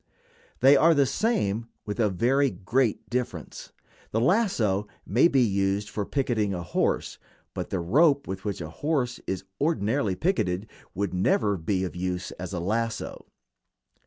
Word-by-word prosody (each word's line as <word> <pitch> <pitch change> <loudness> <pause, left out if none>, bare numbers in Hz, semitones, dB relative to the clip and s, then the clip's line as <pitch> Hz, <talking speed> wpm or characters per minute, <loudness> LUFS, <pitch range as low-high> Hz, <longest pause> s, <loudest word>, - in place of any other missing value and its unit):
They 135 +2 +7
are 165 +2 +5
the 140 -1 +4
same, 115 - 0 0.2
with 105 +2 -4
a 110 -3 +3
very 130 +9 +2
great 110 +5 0
difference. 120 -9 -4 0.4
The 110 - 0
lasso 115 - +2 0.2
may 120 - +4
be 135 -6 +3
used 100 -1 0
for 105 -2 -3
picketing 110 -8 0
a 85 - -4
horse, - - -1 0.3
but - - -4
the 95 - -1
rope 140 - +3
with 95 0 -5
which 100 -4 -3
a 80 - -5
horse 135 - -1
is 95 - -2 0.2
ordinarily 135 - +1
picketed 105 - 0 0.3
would 100 0 -2
never 100 +3 +2
be 95 +2 -1
of 90 - -4
use 90 0 -3
as 90 0 -5
a 90 - -3
lasso. 110 +5 -3
105 Hz, 155 wpm, -26 LUFS, 95-135 Hz, 0.4 s, They